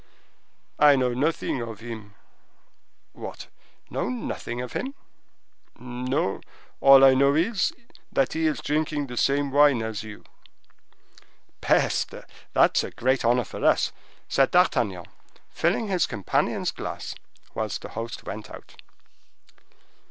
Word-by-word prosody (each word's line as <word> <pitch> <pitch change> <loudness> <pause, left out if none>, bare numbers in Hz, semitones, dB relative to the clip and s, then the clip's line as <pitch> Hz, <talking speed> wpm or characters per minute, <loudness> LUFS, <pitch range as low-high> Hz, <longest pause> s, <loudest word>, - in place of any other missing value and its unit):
"I 145 -1 +7
know 125 -2 +1
nothing 140 -1 -1
of 115 -3 -7
him." 110 -3 -9 1.0
"What!—know - - -7
nothing 120 -1 -4
of 125 0 -6
him?" 270 +2 -4 0.8
"No, 125 -3 -2 0.4
all 135 0 +8
I 135 - +7
know 140 +2 +4
is, 185 +4 +1 0.4
that 135 -2 +1
he 160 0 +1
is 155 - -1
drinking 150 0 -1
the 125 -2 -8
same 140 +2 +1
wine 145 -4 +4
as 110 -2 -4
you." 110 -1 -10 1.4
"Peste!—that - - +1
is - - +1
a - - -4
great 130 +2 0
honor 120 +1 +3
for - - -8
us," - - +3 0.4
said 135 -1 +3
D'Artagnan, 110 - +2 0.5
filling 225 - 0
his 185 -4 +1
companion's 100 -6 -1
glass, - - -6 0.4
whilst - - -3
the - - -7
host 115 +1 -6
went 105 +1 -7
out. - - -12
130 Hz, 120 wpm, -25 LUFS, 115-145 Hz, 1.4 s, all